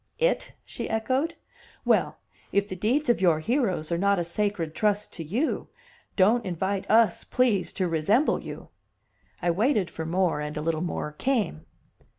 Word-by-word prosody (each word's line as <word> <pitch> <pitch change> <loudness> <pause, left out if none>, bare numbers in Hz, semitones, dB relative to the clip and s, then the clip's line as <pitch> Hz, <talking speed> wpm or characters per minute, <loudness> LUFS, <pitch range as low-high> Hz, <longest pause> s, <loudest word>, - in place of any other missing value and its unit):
"It?" - - 0
she - - -5
echoed. 255 +8 0 0.5
"Well, - - +2 0.3
if 200 0 +2
the 185 - -5
deeds 245 +11 0
of 240 -5 +2
your 170 -4 +4
heroes 190 - 0
are 170 - +1
not 200 +1 +3
a 175 - 0
sacred 170 -2 -2
trust 210 +1 0
to 165 - -5
you, 225 - -1 0.5
don't 220 +5 +4
invite 190 +2 -2
us, 225 0 +4
please, 235 -7 +1
to 185 - 0
resemble 175 - +2
you." - - -9 0.7
I 175 - +3
waited 210 0 +1
for 160 0 -5
more, 175 -3 +1
and 150 0 -4
a - - -2
little 160 -1 0
more 170 -3 -3
came. 210 - -1
195 Hz, 165 wpm, -26 LUFS, 170-230 Hz, 0.7 s, your